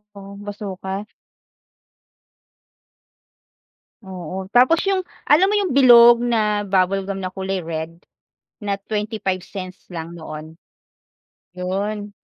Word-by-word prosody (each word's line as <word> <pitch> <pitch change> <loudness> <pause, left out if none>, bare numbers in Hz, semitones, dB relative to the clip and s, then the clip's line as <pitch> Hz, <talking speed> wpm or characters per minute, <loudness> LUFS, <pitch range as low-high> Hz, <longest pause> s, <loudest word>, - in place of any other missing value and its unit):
Oo, 200 0 -10
Bazooka. 200 -1 -5 3.0
Oo, 185 0 -7
tapos 255 +9 +4
yung 375 -2 0 0.2
alam 310 +6 +6
mo 405 - +1
yung 305 -9 -1
bilog 240 -2 +8
na 210 -3 +1
bubblegum 195 0 0
na 185 - -3
kulay 190 0 -3
red 165 +1 -6 0.6
na 205 -2 -2 0.2
25 210 -3 -2
cents 185 -2 -8
lang 165 +1 -6
noon. 155 +1 -9 1.0
Yun. 205 +3 -3
195 Hz, 100 wpm, -21 LUFS, 185-215 Hz, 3.0 s, bilog